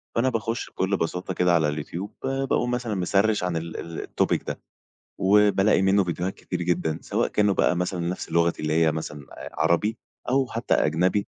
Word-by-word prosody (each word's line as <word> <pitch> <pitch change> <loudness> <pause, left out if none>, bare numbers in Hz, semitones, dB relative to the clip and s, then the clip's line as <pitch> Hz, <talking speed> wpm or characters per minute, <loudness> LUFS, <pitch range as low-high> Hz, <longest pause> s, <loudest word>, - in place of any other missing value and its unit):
فأنا 125 +3 +3
باخش 115 -1 -2
بكل 95 +1 -1
بساطة 90 +2 -3
كده 90 0 +2
على 80 -2 +3
اليوتيوب 80 +6 -5
ب - - -1 0.2
باقوم 120 -1 +1
مثلًا 120 -4 -2
مسرِّش 100 +2 +1
عن 90 -2 -1
ال 80 0 -5
ال 85 -1 -6
الtopic - - 0
ده، - - -4 0.6
وبالاقي 100 0 +4
منه 95 0 +4
فيديوهات 90 +2 -2
كتير 90 -1 -5
جدًا، 85 -2 0
سواء - - 0
كانوا 105 -2 +2
بقى 90 - +2
مثلًا 90 0 -2
نفس 90 - -5
لغتي 85 -1 +2
اللي 75 - 0
هي 80 0 +3
مثلًا 75 -3 -6
آآ - - -9
عربي، 85 +8 +2 0.3
أو 135 0 +3
حتى 115 0 -1
أجنبي. 90 +6 +1
90 Hz, 185 wpm, -25 LUFS, 85-105 Hz, 0.6 s, وبالاقي